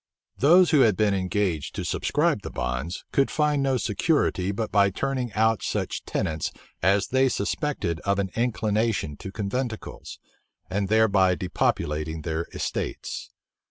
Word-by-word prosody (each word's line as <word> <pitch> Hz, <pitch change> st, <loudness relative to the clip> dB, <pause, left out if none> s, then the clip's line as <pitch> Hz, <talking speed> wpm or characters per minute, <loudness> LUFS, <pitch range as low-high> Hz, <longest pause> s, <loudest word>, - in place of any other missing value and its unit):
Those 175 Hz, +6 st, +6 dB
who 150 Hz, -, +5 dB
had 110 Hz, -7 st, +4 dB
been 105 Hz, -2 st, +3 dB
engaged 95 Hz, -4 st, -1 dB
to -, -, -3 dB
subscribe -, -, +1 dB
the -, -, -6 dB
bonds, 60 Hz, +8 st, -3 dB
could 135 Hz, -, +2 dB
find 150 Hz, -2 st, +1 dB
no 135 Hz, -1 st, +2 dB
security 105 Hz, -, +1 dB
but 110 Hz, +2 st, -3 dB
by 100 Hz, -1 st, +4 dB
turning 130 Hz, +3 st, -2 dB
out 110 Hz, 0 st, +2 dB
such -, -, -2 dB
tenants 80 Hz, -1 st, -2 dB, 0.3 s
as 100 Hz, +3 st, +2 dB
they 130 Hz, +1 st, +3 dB
suspected 100 Hz, -, -2 dB
of 100 Hz, +3 st, 0 dB
an 95 Hz, -2 st, -1 dB
inclination 110 Hz, -7 st, 0 dB
to 95 Hz, -, -7 dB
conventicles, 110 Hz, +3 st, -4 dB, 0.5 s
and 100 Hz, +1 st, 0 dB
thereby 100 Hz, -4 st, +4 dB
depopulating 80 Hz, -3 st, -1 dB
their 80 Hz, +1 st, -2 dB
estates. -, -, -4 dB
100 Hz, 140 wpm, -25 LUFS, 90-125 Hz, 0.5 s, Those